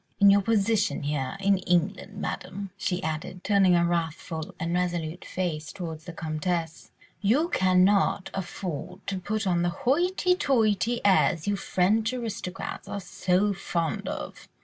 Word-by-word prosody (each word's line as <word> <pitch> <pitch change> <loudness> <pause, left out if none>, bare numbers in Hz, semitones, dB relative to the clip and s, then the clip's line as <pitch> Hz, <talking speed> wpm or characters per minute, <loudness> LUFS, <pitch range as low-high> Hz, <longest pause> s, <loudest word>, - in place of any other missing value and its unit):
In 200 -1 +8
your 200 0 +5
position 215 -2 +1
here 145 +4 -2
in 195 -1 +3
England, 185 +3 0
Madame," 195 -1 -5
she 180 0 -2
added, 160 +3 -4
turning 195 -3 +4
a 170 0 +3
wrathful 165 -1 -3
and 165 +1 -2
resolute 175 -2 -1
face 160 -4 -3
towards 160 -4 -6
the 175 - -6
Comtesse, 165 +1 -3 0.3
"you 265 - +3
cannot 185 - +3
afford 185 -1 -5
to 195 -1 -2
put 215 +4 -2
on 175 -2 +2
the 175 - +2
hoity 345 - +2
toity 235 - +1
airs 190 -4 +4
you 205 - +2
French 215 +5 +1
aristocrats 220 -6 -5
are 200 - -4
so 190 +1 +1
fond 170 -4 -2
of. - - -6
185 Hz, 145 wpm, -27 LUFS, 170-205 Hz, 0.3 s, In